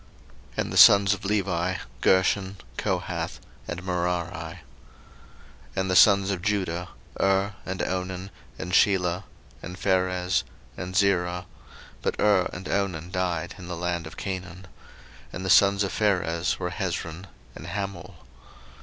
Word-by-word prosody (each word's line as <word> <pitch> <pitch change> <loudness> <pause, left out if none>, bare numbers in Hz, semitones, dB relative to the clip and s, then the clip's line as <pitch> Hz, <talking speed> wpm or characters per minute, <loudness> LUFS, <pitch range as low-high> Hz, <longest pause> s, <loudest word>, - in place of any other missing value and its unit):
01:046:011 - - -21
And - - -6
the - - -1
sons 100 0 +8
of 100 -1 -7
Levi; 95 -3 0 0.3
Gershon, 95 +1 +2 0.2
Kohath, - - -2 0.3
and 85 +1 -5
Merari. 90 -1 -1
01:046:012 85 0 -7 1.2
And 95 -1 0
the - - +2
sons 100 +1 +6
of 95 -3 -3
Judah; 90 -4 -1 0.3
Er, 95 +1 +2
and 95 0 -2
Onan, 95 +1 -3 0.3
and 85 +3 -5
Shelah, 90 -1 +3 0.4
and 90 +1 -7
Pharez, 90 -1 +1 0.3
and 90 0 -6
Zarah: 90 -3 +2 0.6
but - - -1
Er 100 -4 +3
and 90 +1 -7
Onan 90 -4 -2
died 90 -1 -2
in 90 - -9
the 90 -1 -5
land 85 -1 -2
of - - -11
Canaan. 95 -1 -5 0.7
And 90 +2 -6
the 95 - +2
sons 100 0 +6
of 100 - -2
Pharez 90 -5 +1
were 90 -1 -3
Hezron 90 -2 -4 0.3
and - - -9
Hamul. 100 -3 -5
90 Hz, 140 wpm, -26 LUFS, 90-95 Hz, 1.2 s, sons